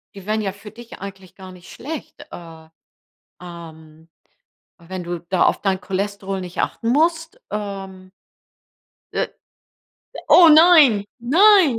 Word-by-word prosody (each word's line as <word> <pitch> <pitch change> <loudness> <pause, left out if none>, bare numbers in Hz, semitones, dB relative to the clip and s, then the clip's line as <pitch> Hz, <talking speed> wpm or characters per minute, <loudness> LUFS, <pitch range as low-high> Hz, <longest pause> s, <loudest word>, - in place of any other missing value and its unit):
die 195 -2 -12
wären 215 +1 -1
ja 195 -2 -3
für 205 +1 -13
dich 235 +1 -13
eigentlich 190 -1 -11
gar 190 -1 -12
nicht 180 -1 -15
schlecht. 305 0 -9
Äh 165 -2 -12 0.7
ähm, 160 -2 -13 0.7
wenn 180 +2 -8
du 175 0 -5
da 185 -2 +2
auf - - +1
dein 190 -1 -1
Cholesterol 195 0 -4
nicht 180 -1 -4
achten 230 - -3
musst 325 - 0
ähm. 195 -2 -7 1.0
Äh. - - -1 1.0
Oh 345 -2 +7
nein 305 - +6
nein. 335 - +4
200 Hz, 125 wpm, -20 LUFS, 185-275 Hz, 1.0 s, Oh